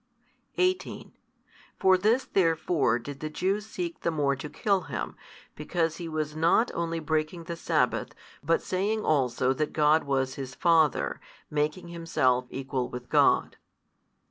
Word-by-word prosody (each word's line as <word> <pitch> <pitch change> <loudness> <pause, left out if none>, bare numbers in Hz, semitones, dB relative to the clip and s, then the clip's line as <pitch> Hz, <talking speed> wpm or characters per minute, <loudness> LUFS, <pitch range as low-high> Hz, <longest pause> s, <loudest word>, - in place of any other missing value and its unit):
18 365 0 -1 0.7
For 190 0 +5
this 215 +7 +2
therefore 160 - +2
did 140 +3 -8
the 155 - -4
Jews 195 +6 -1
seek 175 -5 -5
the - - -1
more 145 -4 +1
to 135 +3 -7
kill 200 +2 +1
Him, - - -4 0.4
because 165 +1 -1
He 170 -2 -6
was 155 -1 -3
not 165 +9 +3
only 165 -1 -2
breaking 155 +2 -2
the 170 0 -5
sabbath, 170 - 0 0.3
but 465 - +1
saying 205 +4 -1
also 130 -3 +2
that 150 +3 -2
God 155 +1 +3
was 135 -2 0
His 135 0 -7
Father, 165 -4 +2 0.3
making 150 +4 -1
Himself 130 -7 +1
Equal 130 -2 -3
with 125 0 -8
God. - - +3
160 Hz, 145 wpm, -28 LUFS, 140-175 Hz, 0.7 s, For